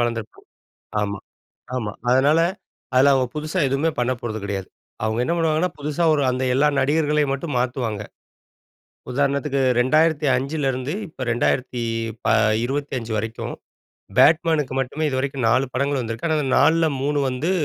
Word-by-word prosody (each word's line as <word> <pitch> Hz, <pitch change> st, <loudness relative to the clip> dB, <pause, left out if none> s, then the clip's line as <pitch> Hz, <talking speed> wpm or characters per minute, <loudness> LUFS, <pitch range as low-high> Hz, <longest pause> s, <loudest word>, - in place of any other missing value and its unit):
வளர்ந்திருப்பாங்க. 115 Hz, -2 st, -3 dB, 0.6 s
ஆமா. 105 Hz, 0 st, -3 dB, 0.6 s
ஆமா. 105 Hz, -4 st, -3 dB, 0.2 s
அதனால, 140 Hz, +5 st, +4 dB, 0.6 s
அதுல 135 Hz, +2 st, +6 dB
அவங்க 130 Hz, -1 st, +1 dB
புதுசா 155 Hz, +4 st, -2 dB
எதுவுமே 140 Hz, +5 st, +1 dB
பண்ண 125 Hz, +1 st, +1 dB
போறது 110 Hz, -2 st, -4 dB
கிடையாது. 100 Hz, -2 st, -4 dB, 0.4 s
அவங்க 110 Hz, +1 st, -1 dB
என்ன 165 Hz, -, 0 dB
பண்ணுவாங்கன்னா. 165 Hz, +2 st, +1 dB
புதுசா 150 Hz, +3 st, -2 dB
ஒரு 145 Hz, -, 0 dB
அந்த 130 Hz, +1 st, -2 dB
எல்லா 145 Hz, +3 st, +4 dB
நடிகர்களையும் 150 Hz, 0 st, +1 dB
மட்டும் 140 Hz, +1 st, -4 dB
மாத்துவாங்க. 120 Hz, -4 st, -2 dB, 1.1 s
உதாரணத்துக்கு 140 Hz, +1 st, 0 dB, 0.2 s
2005ல 145 Hz, +1 st, +2 dB
இருந்து, 130 Hz, +3 st, -3 dB, 0.2 s
இப்ப 155 Hz, -, -24 dB
2025 115 Hz, +1 st, 0 dB
வரைக்கும். 110 Hz, +2 st, -4 dB, 0.6 s
பேட்மேன்க்கு 160 Hz, -4 st, +4 dB
மட்டுமே 135 Hz, +4 st, -2 dB
இதுவரைக்கும் 135 Hz, -2 st, -1 dB
4 130 Hz, +4 st, +3 dB
படங்கள் 140 Hz, +1 st, 0 dB
வந்திருக்கு. 115 Hz, +3 st, -4 dB
ஆனா 160 Hz, -, +2 dB, 0.2 s
4ல 165 Hz, 0 st, +4 dB, 0.2 s
3 145 Hz, +1 st, 0 dB
வந்து 130 Hz, +7 st, -2 dB
135 Hz, 125 wpm, -22 LUFS, 120-150 Hz, 1.1 s, அதுல